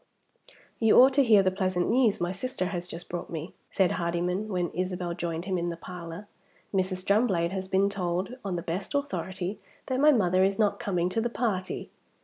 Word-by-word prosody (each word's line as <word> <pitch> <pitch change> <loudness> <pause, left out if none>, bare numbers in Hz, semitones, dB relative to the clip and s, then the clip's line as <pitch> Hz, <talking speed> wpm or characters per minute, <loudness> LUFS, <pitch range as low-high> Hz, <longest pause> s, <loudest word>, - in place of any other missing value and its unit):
"You 225 -2 +6
ought 260 +2 +7
to 280 +1 +5
hear 215 -5 +6
the 185 - +2
pleasant 185 -2 0
news 235 -3 +3
my 175 +1 -1
sister 190 0 -3
has 175 -2 -4
just 170 -1 -8
brought 175 - -5
me," 165 +1 -6 0.2
said 190 -2 +2
Hardyman, 175 +4 -1
when 180 -4 -1
Isabel 180 -1 -2
joined 170 -1 -4
him 185 -2 -1
in 170 0 -1
the 170 - -5
parlor. 175 +2 -8 0.5
"Mrs. 185 -1 -1
Drumblade 195 -5 +2
has 190 -1 -4
been 190 +1 +3
told, 185 +1 -2
on 195 -3 -2
the 170 - -3
best 185 - -4
authority, 195 -9 -3 0.3
that 260 -1 -1
my 300 +2 +7
mother 185 -7 +3
is 195 +1 +2
not 210 -2 +2
coming 180 -3 0
to 225 +5 0
the 240 - 0
party." 210 -6 -2
185 Hz, 195 wpm, -28 LUFS, 175-210 Hz, 0.5 s, ought